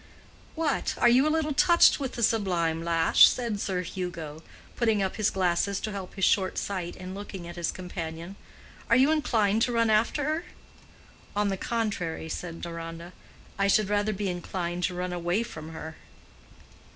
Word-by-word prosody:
"What! 315 -3 -1
are 240 - +4
you 260 +5 +5
a - - +3
little 310 -1 0
touched 340 +4 +5
with 270 -3 -3
the 235 - -3
sublime 175 -7 +1
lash?" 165 -1 +6
said 235 -5 -2
Sir 185 -2 -1
Hugo, 165 -4 -6 0.3
putting 220 -4 +2
up 190 - -3
his 215 -1 +2
glasses 190 +1 0
to 215 - -3
help 195 -3 -7
his 195 - +2
short 190 -2 +2
sight 185 -3 -3
in 185 0 -8
looking 195 -3 -7
at 175 - -8
his 175 -1 -1
companion. 170 0 -6 0.5
"Are - - +5
you 270 +4 +5
inclined 225 -9 +2
to 245 - +2
run 230 -1 +2
after 225 +7 +2
her?" 310 +4 -1 0.9
"On 205 0 +1
the 195 - 0
contrary," 190 -7 -3
said 165 +1 -6
Deronda, 165 +1 -7 0.5
"I 200 - +3
should 205 0 +3
rather 205 +1 +1
be 205 0 -3
inclined 175 -1 -3
to 180 - -3
run 180 0 -3
away 175 +5 0
from 160 -9 -9
her." 160 0 -8
195 Hz, 175 wpm, -27 LUFS, 175-225 Hz, 0.9 s, lash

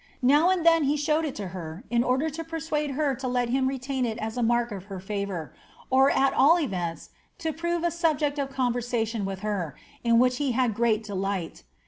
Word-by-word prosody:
Now 295 +7 +5
and 365 -3 +1
then 330 -2 +5
he 290 +2 +2
showed 300 +1 +1
to 200 -2 -5
her, 170 +1 -7
in 240 0 +3
order 265 +6 +1
to 330 +3 -5
persuade 320 -2 -2
her 295 -3 +1
to 260 +1 -4
let 245 -1 0
him 260 +1 +1
retain 265 0 -2
it 225 -2 -1
at 220 0 -4
a 245 - -1
mark 240 0 +2
of 200 0 -8
h< 190 - -5
favour, 200 -5 -4 0.4
or 265 +1 +5
at 275 0 +2
all 290 +6 +6
erenta 180 - -3 0.3
to 320 -2 -2
prore 340 +2 -1
a 345 - +2
subject 305 -4 0
of 275 -1 -1
conversation 240 -4 -1
with 195 -1 -5
her, 195 -9 -2 0.3
i 235 - +1
which 250 +2 +4
he 280 -4 0
had 245 -2 +1
great 225 0 +1
delight. 195 -4 -3
250 Hz, 205 wpm, -26 LUFS, 215-295 Hz, 0.4 s, all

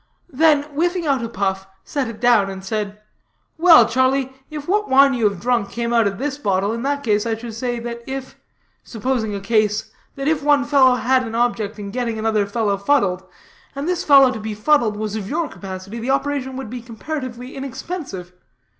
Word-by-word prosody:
Then 300 +1 +4
whiffing 335 +4 -1
out 270 -5 +1
a 230 - -3
puff, 190 -2 -2 0.2
set 280 -4 -2
it 225 -2 -8
down, 235 -5 +4
and 190 0 -8
said: 210 0 -3 0.6
"Well, 325 -9 +8
Charlie, 260 +2 +1 0.2
if 300 -2 -7
what 420 +3 +1
wine 275 +1 +6
you 230 -4 +2
have 200 -3 -8
drunk 240 -2 0
came 235 0 -3
out 230 -3 +4
of 195 0 -3
this 280 +2 -3
bottle, 200 -3 0
in 230 - -4
that 285 +2 -1
case 210 -1 +1
I 225 - 0
should 225 0 -8
say 240 +1 -3
that 235 0 -6
if 265 0 -6 0.5
supposing 225 -2 -2
a - - -3
case 215 +1 0 0.2
that 275 +1 -4
if 310 -1 +1
one 290 -1 +3
fellow 270 -3 +5
had 255 +2 +2
an 225 -2 -5
object 230 -3 0
in 200 -1 -6
getting 235 -1 -2
another 215 -2 +1
fellow 205 -1 0
fuddled, 200 -5 +1 0.5
and 280 +3 -4
this 360 0 -1
fellow 275 -3 +7
to 225 - -5
be 215 0 -5
fuddled 225 -2 +2
was 215 0 -3
of 205 -2 -5
your 325 +1 -1
capacity, 195 +2 -8
the 235 +3 -4
operation 275 -1 -1
would 265 -5 -6
be 250 -1 -6
comparatively 250 +1 -6
inexpensive. 270 - -6
240 Hz, 200 wpm, -20 LUFS, 210-275 Hz, 0.6 s, Well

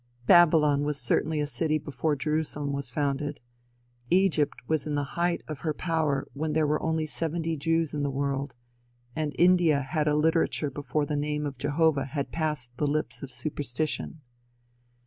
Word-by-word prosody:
Babylon 155 -4 +5
was 145 -1 0
certainly 150 +5 +1
a 150 - +1
city 150 +3 0
before 150 +1 -2
Jerusalem 150 -1 -1
was 140 -2 -3
founded. 145 +1 -2 0.7
Egypt 175 -5 +3
was 155 -1 0
in 150 - -1
the 145 - 0
height 175 0 0
of 155 -3 -6
her 155 -1 -2
power 160 -5 0
when 155 +2 -2
there 155 0 +2
were 150 +1 0
only 160 -1 0
seventy 165 +1 -2
Jews 165 +1 0
in 150 - -2
the 140 - 0
world, 140 0 -2 0.6
and 155 -2 -1
India 175 -5 +4
had 150 +2 -1
a 150 - +3
literature 160 -1 +1
before 145 +2 -2
the 150 - -2
name 150 +1 -1
of 140 -3 -5
Jehovah 145 0 +2
had 140 +1 -4
passed 150 -7 -2
the 150 - +1
lips 155 +1 -2
of 140 - -6
superstition. 145 +4 -3
150 Hz, 165 wpm, -27 LUFS, 140-160 Hz, 0.7 s, Babylon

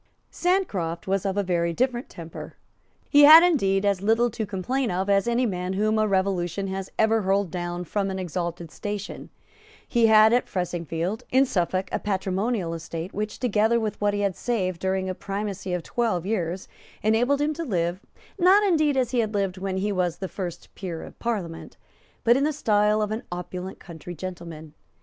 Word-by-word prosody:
Sancroft 200 - -1
was 195 +1 0
of 195 +1 -2
a 205 - +2
very 170 -2 0
different 245 +4 -1
temper. 165 -1 -9 0.5
He 290 - +5
had, 320 +3 +11
indeed, 200 - +2
as 200 -2 +1
little 225 +3 +2
to 220 -1 -4
complain 230 +7 -1
of 190 +3 0
as 195 +3 +3
any 235 +2 +2
man 180 -3 -2
whom 215 +2 +1
a 215 - +2
revolution 190 -1 0
has 190 0 -4
ever 220 0 +3
hurled 195 -2 +1
down 175 0 -3
from 195 +2 -2
an 190 - -3
exalted 170 -2 -4
station. 205 -1 -6 0.6
He 235 -2 +3
had 220 +1 +7
at 245 - +2
Fressingfield, 175 +2 -3
in 265 +2 +4
Suffolk, 185 -4 -1
a - - -1
patrimonial 195 -1 -1
estate, 165 +1 -6
which, 210 +1 -3
together 230 -1 +2
with 215 -2 -3
what 205 0 +2
he 205 - -1
had 200 -3 0
saved 185 -8 -2
during 190 0 -1
a 185 - -2
primacy 195 0 -4
of 180 -2 -2
twelve 220 -8 -1
years, 185 -3 -2 0.4
enabled 240 +6 +2
him 295 +1 +1
to 335 +2 -4
live, 175 - -1 0.4
not 380 +4 +6
indeed 310 -7 +2
as 250 -2 +1
he 250 - +1
had 220 -2 -1
lived 195 -2 -1
when 190 0 -2
he 205 +2 0
was 180 -3 0
the 190 - -4
first 180 -3 -7
peer 175 -5 -6
of - - -12
Parliament, 190 -9 -4 0.5
but 235 +1 +5
in 275 - +2
the 305 +1 +1
style 210 -5 +2
of 210 - -3
an 220 +2 -2
opulent 180 +1 -6
country 175 0 -9
gentleman. 165 -3 -8
195 Hz, 185 wpm, -25 LUFS, 180-225 Hz, 0.6 s, had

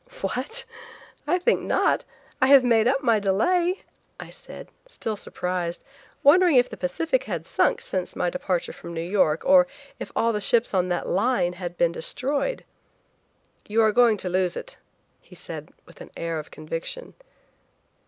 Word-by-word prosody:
"What? 485 0 -3 0.6
I 350 +4 +3
think 370 +7 +1
not. - - +1 0.4
I 260 - +5
have 275 -1 +7
made 230 -2 +3
up 270 +2 +1
my 230 -4 +3
delay," 350 - +1 0.4
I - - -9
said, - - -11 0.2
still 225 - -4
surprised, 180 -3 -4 0.4
wondering 345 +2 +6
if 245 -1 +5
the - - -6
Pacific 325 - -1
had - - -4
sunk - - +1
since 185 -2 -3
my 175 -1 0
departure 180 -3 -2
from 170 - -9
New 165 - -3
York, 175 -5 +2
or 275 -1 +6 0.3
if - - -7
all 230 0 +2
the 210 - -2
ships 235 +2 +1
on 180 -1 +2
that 175 - -2
line 195 -3 +1
had 175 -1 -7
been 170 - +3
destroyed. 280 - -2 1.0
"You 225 +2 +2
are 215 - +4
going 230 -1 +4
to 190 - -4
lose 180 -1 0
it," - - -7 0.5
he - - -17
said - - -9
with - - -16
an - - -10
air 165 -1 -3
of 150 - -9
conviction. 165 - -6
220 Hz, 165 wpm, -24 LUFS, 180-280 Hz, 1.0 s, have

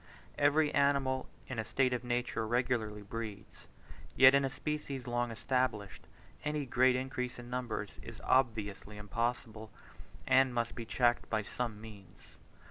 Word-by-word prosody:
Every 150 +1 +3
animal 140 -2 +2 0.2
in 130 -3 -4
a - - 0
state 130 +3 +1
of 125 - -2
nature 120 -2 -1
regularly 110 -3 0
breeds; 105 -1 -7 0.5
yet 130 0 +8
in 140 0 +4
a 135 - 0
species 140 -2 -4
long 120 0 -1
established, 115 -4 -2 0.4
any 150 -1 -1
great 130 0 +4
increase 125 -1 -3
in 120 0 -10
numbers 120 -5 -3
is - - -10
obviously 110 -5 0
impossible, 110 +1 -3 0.6
and 130 -1 +4
must 120 -1 -1
be 115 - -6
checked 120 +2 +1
by 110 -1 0
some 115 0 -4
means. 105 -3 -12
120 Hz, 140 wpm, -33 LUFS, 110-130 Hz, 0.6 s, yet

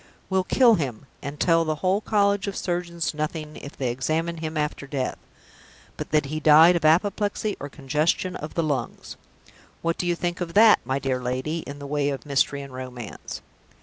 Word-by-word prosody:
Will 190 0 +2
kill 240 +4 +5
him, 135 - -2 0.2
and 140 +2 -6
tell 165 -1 +4
the 155 -1 -1
whole 185 +6 +1
College 200 -2 +1
of 200 - -3
Surgeons 175 -2 -2
nothing, 155 0 -4
if 140 - -10
they 130 -3 -1
examine 160 +7 -1
him 160 0 -4
after 150 -1 -2
death, 135 -2 -3 0.8
but - - -6
that 150 -1 +2
he 155 +3 -3
died 160 +3 +7
of 170 - -1
apoplexy 205 +5 +2
or 145 - -6
congestion 155 +6 0
of 150 - -7
the 165 - +1
lungs! 145 -4 -3 0.7
What 165 0 -1
do 175 - -1
you 175 - +2
think 175 +1 -3
of 170 0 -4
that, 215 +1 +7
my 130 +2 -1
dear 130 -2 -1
lady, 130 +6 -2
in 140 - -7
the 140 - -8
way 145 0 0
of 140 0 -4
mystery 140 0 +1
and 135 -1 -11
romance? 125 -3 -7
155 Hz, 190 wpm, -25 LUFS, 140-175 Hz, 0.8 s, died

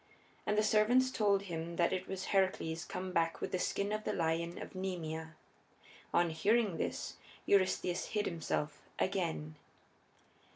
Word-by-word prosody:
And 210 0 +2
the 215 - +4
servants 230 +5 +4
told 200 -4 +2
him 170 -2 -4
that 170 +2 +2
it 185 0 -2
was 190 -1 -4
Heracles 180 -4 +1
come 185 0 -4
back 165 -2 +1
with - - -3
the 185 - 0
skin 200 +3 0
of 215 0 -1
the - - -1
lion 170 0 0
of - - -7
Nemea. 160 -4 -4 0.8
On 170 -1 +3
hearing 210 +3 +2
this - - -3 0.3
Eurystheus 185 -2 +2
hid 210 -1 0
himself 155 -3 -2 0.2
again. 165 -5 -1
185 Hz, 150 wpm, -34 LUFS, 165-200 Hz, 0.8 s, the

